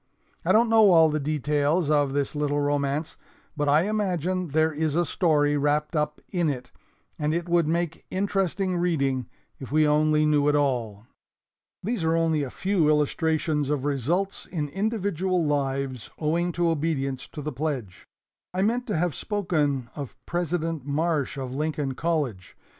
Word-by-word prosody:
I - - +2
don't 230 +2 +5
know 220 -2 +6
all 160 -1 +6
the 155 - 0
details 150 +2 +1
of 145 -2 +3
this 140 -1 -1
little 145 -1 0
romance, 145 +2 -1 0.4
but 145 -1 0
I 150 +3 +5
imagine 185 -3 -1
there 155 +1 +1
is 155 0 -1
a 175 +1 +2
story 150 -3 +2
wrapped 150 +3 0
up 150 0 -1
in 175 -4 +1
it, 130 -3 -5 0.5
and 150 +1 0
it 170 0 -2
would 170 -2 +2
make 170 0 -1
interesting 190 -1 0
reading 140 -8 0 0.3
if 135 -3 -8
we 155 0 +4
only 155 +1 +3
knew 150 -1 +3
it 150 - +3
all. 120 -7 -1 0.8
"These 215 -2 -2
are 160 0 +2
only 165 -2 +2
a 140 - -3
few 185 0 +1
illustrations 150 0 +1
of 145 -2 -1
results 155 +8 -1
in 150 -5 -3
individual 190 -2 -1
lives 135 -4 -1
owing 170 +3 0
to 170 0 +1
obedience 140 -4 -2
to 150 - -8
the 150 0 -4
pledge. 125 - -4 0.5
I 190 - +1
meant 240 +4 0
to 210 - -1
have 175 -1 0
spoken 150 - -1
of 140 -6 -6
President 165 -3 -2
Marsh 145 0 -1
of 130 -2 -4
Lincoln 150 -1 -2
College. 135 - -2
155 Hz, 160 wpm, -26 LUFS, 145-175 Hz, 0.8 s, know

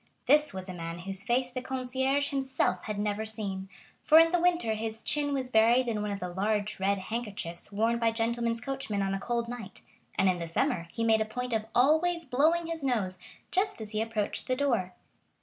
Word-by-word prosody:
This 295 +2 +4
was 190 -1 -7
a 185 - -5
man 165 -1 -5
whose 190 +2 -4
face 250 +2 +1
the 255 0 -4
concierge 265 +2 0
himself 265 -2 0
had 215 -3 -3
never 205 +1 -1
seen, 200 -3 -4 0.3
for 310 - +6
in 330 0 +7
the 355 -1 +2
winter 345 -10 +2
his 220 +1 -4
chin 290 -1 +2
was 260 -2 -2
buried 235 +3 +4
in 220 -3 -1
one 210 - -2
of 200 -1 -3
the 180 - -3
large 210 +2 -1
red 200 +1 +2
handkerchiefs 200 -4 -5
worn 225 +3 +1
by 230 -1 +3
gentlemen's 230 0 0
coachmen 245 -6 -2
on 195 0 -1
a 195 - -1
cold 235 +2 -2
night, 235 -5 -8 0.4
and 190 - +3
in 180 -1 +2
the 170 - -4
summer 170 - 0
he 230 - -3
made 220 -1 +4
a - - +1
point 250 +3 -4
of 220 -1 -1
always 320 +6 +3
blowing 310 +6 +2
his 325 -2 -4
nose 205 -9 0 0.3
just 385 - +1
as 215 -1 -6
he 215 0 -1
approached 225 -2 -2
the 255 - +1
door. 235 -10 0
230 Hz, 210 wpm, -29 LUFS, 205-265 Hz, 0.4 s, in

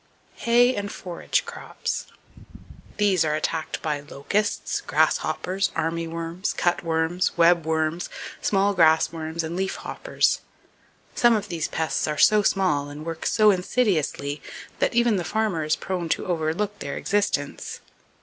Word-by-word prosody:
Hay 245 +2 +5
And 205 0 -3
Forage 175 -2 -2
Crops. - - -5 0.9
—These 200 -5 +3
are 155 -1 0
attacked 160 +1 -3
by 150 -2 -1
locusts, 150 +9 -2
grasshoppers, 190 +2 +1
army 165 +1 -1
worms, 165 +3 -3
cut 175 0 0
worms, 165 +2 0
web 170 -1 +4
worms, 160 +1 0 0.3
small 200 0 +2
grass 160 -3 +4
worms 165 0 -4
and 160 +2 -4
leaf 190 +1 -1
hoppers. - - 0 0.7
Some 240 -1 +4
of 210 - -3
these 165 -3 -2
pests 160 -1 -1
are 150 0 -2
so 215 +5 +6
small 180 -8 +1
and 150 +2 -8
work 165 -1 -3
so 215 -1 +5
insidiously 180 - 0 0.4
that - - +1
even 235 -3 +3
the 180 - -1
farmer 210 -4 -1
is 155 0 +1
prone 180 -2 -4
to - - 0
overlook 175 +4 -1
their 140 -1 -4
existence. 200 -8 -1
170 Hz, 140 wpm, -24 LUFS, 160-200 Hz, 0.9 s, so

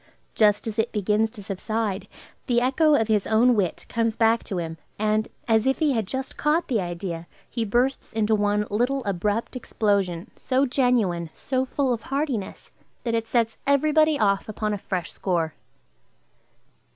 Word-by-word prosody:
Just 210 -2 +3
as 225 -1 -4
it 225 - +1
begins 210 +1 +1
to 215 -2 -11
subside, 200 0 -3 0.4
the 240 -1 +3
echo 290 +5 +3
of 225 -5 +2
his 215 -3 +1
own 235 +3 +4
wit 190 -5 -1
comes 230 -1 0
back 225 0 +3
to 195 - -4
him, 165 -2 -4 0.2
and, 215 +1 +1 0.2
as 225 +1 +3
if 265 - +2
he 310 -3 +2
had 225 -6 -1
just 265 +4 -4
caught 305 +4 +1
the 230 -6 +1
idea, 175 -1 -5 0.2
he 230 - -2
bursts 245 +6 0
into 220 0 +1
one 205 0 +2
little 250 +6 0
abrupt 205 +5 -1
explosion, 200 -6 -1
so 265 +1 +1
genuine, 235 - +1
so 260 +7 -2
full 265 -1 0
of 230 - -4
heartiness, 270 -5 -3 0.3
that 230 - -1
it 225 0 0
sets 230 -2 0
every 280 +2 +3
body 310 0 +4
off 200 -2 +1
upon 215 0 -2
a 205 - -3
fresh 180 -3 -3
score. 170 -5 -1
220 Hz, 170 wpm, -25 LUFS, 200-250 Hz, 0.4 s, own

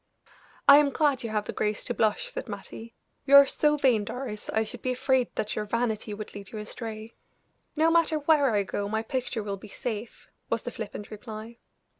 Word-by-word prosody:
"I 280 - +11
am 295 -1 +3
glad 285 -2 +1
you 230 - -4
have 210 -1 -1
the - - -5
grace 210 0 -1
to 240 - -1
blush," 225 - +1
said - - -6
Mattie. 230 +1 -8 0.3
"You 280 - +7
are 280 0 +11
so 300 +2 +2
vain, 250 -7 +3
Doris, 225 -1 -6
I 220 - +1
should 230 +2 -9
be 255 - -1
afraid 260 0 +2
that 210 - -2
your 210 - -2
vanity 220 -1 -1
would 210 +1 -7
lead 200 -2 -9
you 220 - -6
astray." 220 +1 -7 0.6
"No 320 +1 +4
matter 330 -2 +3
where 295 -2 +3
I 205 -3 +2
go 200 +1 -3
my 220 +1 -1
picture 245 -2 -3
will 200 -1 -4
be 205 - -12
safe," 220 +1 -6 0.2
was - - -1
the - - -4
flippant 210 - -7
reply. 220 +2 -8
230 Hz, 205 wpm, -27 LUFS, 215-270 Hz, 0.6 s, I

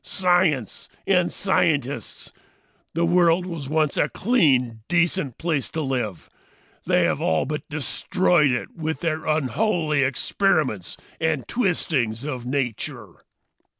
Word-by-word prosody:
Science 175 - +1 0.2
and 180 -3 +2
scientists! 145 - -1 0.6
The 170 +1 +2
world 175 0 +3
was 165 -7 -6
once 155 -1 +1
a 145 - +2
clean, 135 - +2
decent 175 -6 +1
place 160 -5 -1
to 160 - -3
live. 125 - -3 0.6
They - - +3
have - - 0
all 80 - +1
but 150 +3 -5
destroyed 155 +2 +1
it 125 -1 -3
with 160 -1 -3
their 160 -2 -2
unholy 155 - +1
experiments 130 - 0 0.2
and 160 -5 -1
twistings 150 - 0
of 130 -5 -5
nature. 130 -4 -4
155 Hz, 115 wpm, -23 LUFS, 130-175 Hz, 0.6 s, world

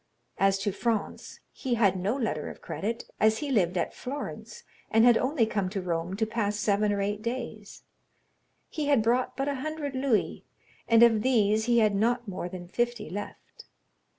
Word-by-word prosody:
As 195 0 +3
to 200 +1 -1
Franz, 220 +1 -3
he 255 -3 -2
had 200 -5 +3
no 195 +7 -1
letter 220 - -2
of - - -10
credit, 230 +4 -4
as 220 0 +4
he 295 -2 -3
lived 185 -7 +2
at - - -1
Florence, 230 -5 -7 0.3
and 225 +1 +4
had 240 -1 +7
only 255 0 +2
come 200 -4 -1
to 195 +1 -3
Rome 175 0 -2
to 220 +2 0
pass 215 -2 -1
seven 210 0 +1
or 200 -1 0
eight 205 +1 -2
days; 235 +3 -6 0.8
he 305 - -4
had 280 -6 +3
brought 245 +3 +1
but 275 +1 -1
a 285 -1 -1
hundred 305 -1 -4
louis, 260 -5 0 0.4
and 230 0 +6
of 225 -2 +5
these 220 -3 +2
he 240 -1 +3
had 215 -2 +4
not 235 +3 +1
more 180 -2 -4
than 175 -1 -8
fifty 240 -2 -2
left. 205 +2 -8
220 Hz, 180 wpm, -28 LUFS, 200-240 Hz, 0.8 s, had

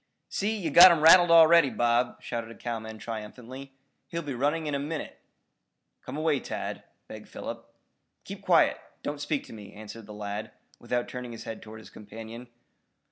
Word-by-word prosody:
"See, 215 +2 -1
you've 165 -7 -3
got 175 +2 +11
him 170 - +2
rattled 175 +2 +8
already, 165 -2 +7
Bob," 120 0 0
shouted 115 -1 -5
a 115 - -11
cowman 110 -2 -6
triumphantly. 120 +5 -8 0.3
"He'll 170 0 -5
be 145 -2 -5
running 145 +6 -1
in 150 - -3
a 140 - 0
minute." 150 +2 -5 0.8
"Come 130 +3 -7
away, 155 -2 +1
Tad," - - -5 0.3
begged - - -11
Philip. - - -8 0.5
"Keep - - -9
quiet. - - +3 0.2
Don't 145 0 -4
speak 145 -1 -2
to - - -13
me," 105 -2 -11
answered 105 +1 -10
the - - -10
lad, 105 0 -6 0.3
without 120 -1 -2
turning 125 -1 -7
his 115 - -9
head 115 - -7
toward 110 0 -11
his - - -15
companion. 115 +3 -10
125 Hz, 175 wpm, -27 LUFS, 110-155 Hz, 0.8 s, got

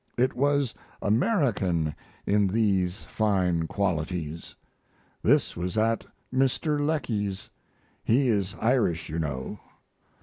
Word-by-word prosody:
It 130 +2 +2
was 140 -1 +2 0.3
American 100 - +1 0.3
in 100 0 +3
these 95 -3 +1
fine 90 -6 +1
qualities. 85 -4 -2 0.7
This - - +3
was 90 +4 -3
at 115 +1 +1 0.3
Mr. 145 +3 +1
Lecky's. 105 - -2 0.5
He 130 +4 +3
is 100 -4 0
Irish, 110 -10 +1
you 80 +2 -2
know. 70 -5 -3
100 Hz, 100 wpm, -27 LUFS, 90-125 Hz, 0.7 s, in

